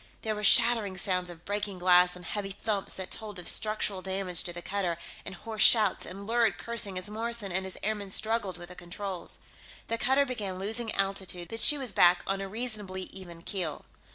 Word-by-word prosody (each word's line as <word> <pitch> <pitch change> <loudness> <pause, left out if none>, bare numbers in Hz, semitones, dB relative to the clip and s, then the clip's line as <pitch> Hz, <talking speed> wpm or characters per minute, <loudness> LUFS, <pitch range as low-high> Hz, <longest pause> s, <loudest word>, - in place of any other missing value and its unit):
There 220 - -1
were 210 0 -6
shattering 220 -3 +5
sounds 180 -1 +1
of 170 -1 -12
breaking 205 -1 -3
glass, 180 0 +4
and 180 0 -12
heavy 200 +2 -4
thumps 200 0 -1
that 190 -1 -6
told 210 -3 -5
of 180 - -6
structural 215 -3 +3
damage 190 -2 -1
to 175 - -1
the 175 0 -9
cutter, 190 -4 -2 0.3
and 190 - -6
hoarse 220 +3 -6
shouts, 220 -2 +5
and 195 +2 -9
lurid 230 +1 +2
cursing 230 -5 -3
as 185 - -2
Morrison 225 -1 -3
and 190 +1 -1
his 190 - -6
airmen 210 -1 -2
struggled 215 -2 -1
with 175 0 -9
the 180 - -11
controls. 180 +1 -5 0.5
The 230 0 -1
cutter 270 +2 +3
began 210 -8 -4
losing 220 +4 -2
altitude, 195 -3 -2
but 225 - -4
she 295 - +8
was 255 -7 -1
back 175 0 +5
on 195 0 -2
a 195 - -5
reasonably 210 -4 -3
even 175 -3 -9
keel. 175 -6 -4
195 Hz, 200 wpm, -29 LUFS, 185-220 Hz, 0.5 s, she